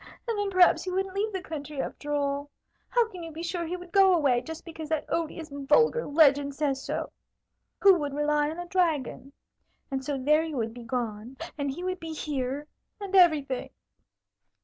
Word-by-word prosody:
And 460 - 0
then 410 -1 -1
perhaps 370 -2 +5
he 370 - -4
wouldn't 380 +1 -1
leave 415 +3 -1
the 380 -2 -4
country, 300 -3 -6
after 295 +2 -4
all. 285 0 -1 0.4
How 480 -2 +3
can 360 - -8
you 330 -1 -7
be 320 +2 -7
sure 345 -1 -2
he 360 +2 -3
would 355 -1 -12
go 385 -1 +6
away, 270 -7 +3
just 320 +3 -8
because 320 -2 -8
that 315 -2 0
odious, 325 -2 -3
vulgar 300 - +3
legend 285 -2 +4
says 280 -2 0
so? - - -3 0.7
Who 395 -1 +8
would 290 -1 -2
rely 295 0 +1
on 320 - -6
a 350 - -5
dragon? 325 -7 -1 0.6
And 265 -1 -2
so 285 0 -2
there 300 +4 +3
you 315 -4 -4
would 225 -1 -2
be 245 - -9
gone, 230 0 -4 0.2
and 285 -2 -2
he 295 +7 -5
would 370 0 -2
be 325 -1 -6
here, 285 -2 -3 0.3
and 395 -1 -4
everything!" 300 -8 +4
305 Hz, 195 wpm, -28 LUFS, 280-360 Hz, 0.7 s, Who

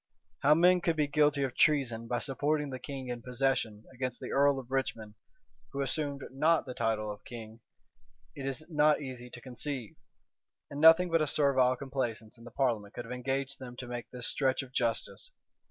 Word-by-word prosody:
How 145 +2 +5
men 180 +2 +5
could 165 -1 +1
be 150 -1 +2
guilty 145 -1 +2
of 130 -2 -2
treason 120 -7 +2
by 120 - 0
supporting 145 +2 0
the 130 - -5
king 135 -2 -6
in 120 -1 -4
possession 125 -4 -1
against 130 0 -3
the - - -6
earl 140 0 +4
of 130 -1 -8
Richmond, 115 -5 -2 0.6
who 140 - -2
assumed 140 0 -2
not 155 +5 +2
the 130 - -6
title 110 -3 -1
of 105 - -10
king, 115 -1 -9 0.8
it 135 -1 -5
is 135 +3 -3
not 150 -2 +3
easy 130 -3 -7
to 120 - -9
conceive; 130 -1 -5 0.8
and 145 +1 -4
nothing 165 +2 +7
but 165 -1 +3
a 155 - +1
servile 130 -3 +3
complaisance 125 -5 -4
in 115 - -14
the - - -8
parliament 115 -5 -1
could 120 - -5
have 115 - -9
engaged 135 +2 -2
them 125 -2 -8
to 125 - -7
make 120 -1 -6
this 125 -1 -6
stretch 135 -1 +1
of 130 - -12
justice. 120 - -1
135 Hz, 190 wpm, -31 LUFS, 120-145 Hz, 0.8 s, nothing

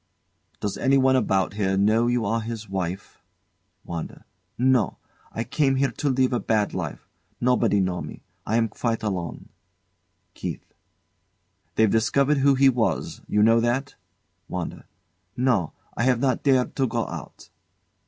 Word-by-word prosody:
Does 105 - -3
anyone 130 -1 +4
about 95 -7 +1
here 95 -2 0
know 110 +4 +3
you 120 -1 +1
are 115 +3 0
his 110 -1 -6
wife? 95 0 -5 0.6
WANDA. 85 -2 -6 0.3
No. 130 -2 +2 0.3
I 115 - -3
came 135 +1 +1
here 135 +1 +1
to 145 - -2
live 130 -1 +2
a 120 - +1
bad 105 -2 0
life. - - -5 0.3
Nobody 120 -4 +2
know 90 -1 -1
me. - - -9 0.2
I 110 - -1
am 115 -1 +3
quite 115 +1 -2
alone. 90 -6 -4 0.8
KEITH. - - -7 1.0
They've 110 - +4
discovered 135 +7 +2
who 140 0 +4
he 135 +1 +5
was 120 -4 0
you 105 - +2
know 115 +1 +5
that? 120 +4 0 0.6
WANDA. - - -5 0.5
No; 120 - +1 0.2
I - - -2
have 125 -2 +3
not 130 0 +1
dared 130 -3 +2
to 135 -2 +2
go 115 -1 -1
out. - - -9
115 Hz, 145 wpm, -24 LUFS, 105-130 Hz, 1.0 s, he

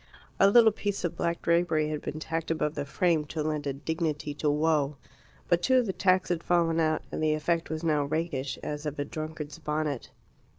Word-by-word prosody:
A 195 - +7
little 225 +1 +7
piece 205 -1 -3
of 175 - -1
black 170 0 -2
drapery 170 -2 +2
had 150 -1 -3
been 155 - -5
tacked 165 0 -3
above 155 -2 0
the 145 -2 -3
frame 165 +2 +1
to 155 +1 -3
lend 150 -1 -2
a 140 - -1
dignity 150 0 -2
to 150 +1 0
woe. 150 -1 +1 0.5
But 175 0 +3
two 260 +7 +3
of 250 - +3
the 190 - -2
tacks 185 -1 +2
had 175 -2 0
fallen 170 -2 +2
out, 155 -1 +1
and - - -3
the 155 -1 +2
effect 165 +2 -1
was 160 +1 -4
now 150 -3 +2
rakish, 140 -3 -2
as 150 +1 -4
of 150 - -4
a 145 - -1
drunkard's 155 -1 -6
bonnet. 150 -3 -2
155 Hz, 210 wpm, -28 LUFS, 150-170 Hz, 0.5 s, A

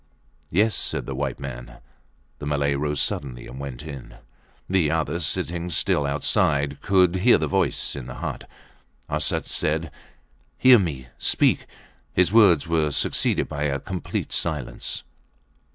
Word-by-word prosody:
Yes, 105 +6 +2
said - - -1
the 70 - -4
white 70 0 -3
man. - - -8 0.6
The 75 - -5
Malay 70 -1 +1
rose 75 0 -1
suddenly 65 -4 -1
and 65 - -9
went 70 -1 -6
in. 70 -5 -9 0.5
The 90 -5 +2
other, 80 +1 -1
sitting 85 +2 -1
still 75 -2 +1
outside, 70 0 +1
could 95 -2 +3
hear 120 +7 +5
the - - -1
voice 95 -2 0
in 65 -3 -7
the 60 - -7
hut. - - -6 0.6
Arsat - - 0
said: 80 0 -1 0.7
Hear 130 -2 +7
me! 70 -10 -3
Speak! - - +2 0.5
His 90 0 +3
words 100 -9 +6
were 80 -2 +1
succeeded 70 - 0
by 75 +1 -3
a 70 -1 0
complete 95 +1 -4
silence. 75 -7 -3
75 Hz, 140 wpm, -24 LUFS, 70-90 Hz, 0.7 s, Hear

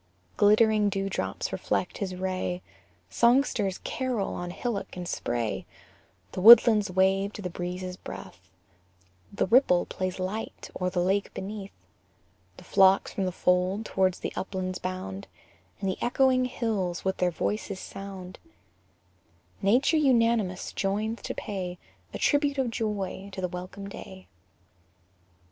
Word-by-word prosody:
Glittering 210 0 +4
dewdrops 195 0 -2
reflect - - -2
his 190 -3 -3
ray, 185 -1 -3 0.5
Songsters 235 -6 +2
carol 250 -7 -2
on 175 0 -4
hillock 200 +1 -4
and 180 -1 -5
spray, 120 -7 -2 0.6
The 185 - -4
woodlands 220 -1 +9
wave 190 +2 +2
to - - -7
the 180 - -3
breeze's 180 +1 -5
breath, 90 - -10 0.8
The 200 - 0
ripple 205 -5 +4
plays 185 -1 -3
light 190 +4 -5
o'er 180 - +1
the 180 -1 -1
lake 195 +2 +1
beneath, 195 - -7 0.7
The - - -12
flocks 190 0 +4
from 195 - -1
the 185 - -1
fold 180 +4 +1
towards 185 -3 +1
the - - -4
uplands 185 -1 -3
bound, 185 - -5 0.5
And 195 - -2
the 190 - -2
echoing 255 +1 +3
hills 210 -9 -2
with 190 - 0
their 180 - +2
voices 200 +3 -3
sound: 195 -2 -8 1.2
Nature 245 +10 +3
unanimous 230 -9 +2
joins 215 +3 -1
to - - -5
pay 185 -3 -4 0.3
A - - -5
tribute 290 -1 +2
of 260 -3 0
joy 200 -3 -3
to - - -6
the 185 - 0
welcome 180 +3 -7
day. 190 -1 -10
195 Hz, 130 wpm, -27 LUFS, 185-220 Hz, 1.2 s, woodlands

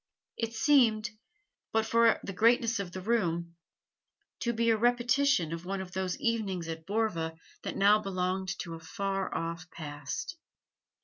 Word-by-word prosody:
It 230 0 -3
seemed, 225 -4 +4 0.6
but 220 0 +2
for 230 0 +4
the 195 - -5
greatness 230 +3 +3
of 190 -3 -4
the 185 - -6
room, 170 -6 0 0.8
to 235 - 0
be 230 0 +2
a - - +4
repetition 245 - +2
of 165 0 -5
one 195 +2 -3
of 190 -1 -6
those 185 0 -2
evenings 200 -7 -1
at 160 0 -6
Borva 195 -7 -1 0.3
that - - -5
now 205 +2 +6
belonged 185 -1 -2
to 170 - -7
a 165 - -7
far 195 +3 -3
off 165 +2 -4
past. 145 - -6
195 Hz, 150 wpm, -30 LUFS, 175-230 Hz, 0.8 s, now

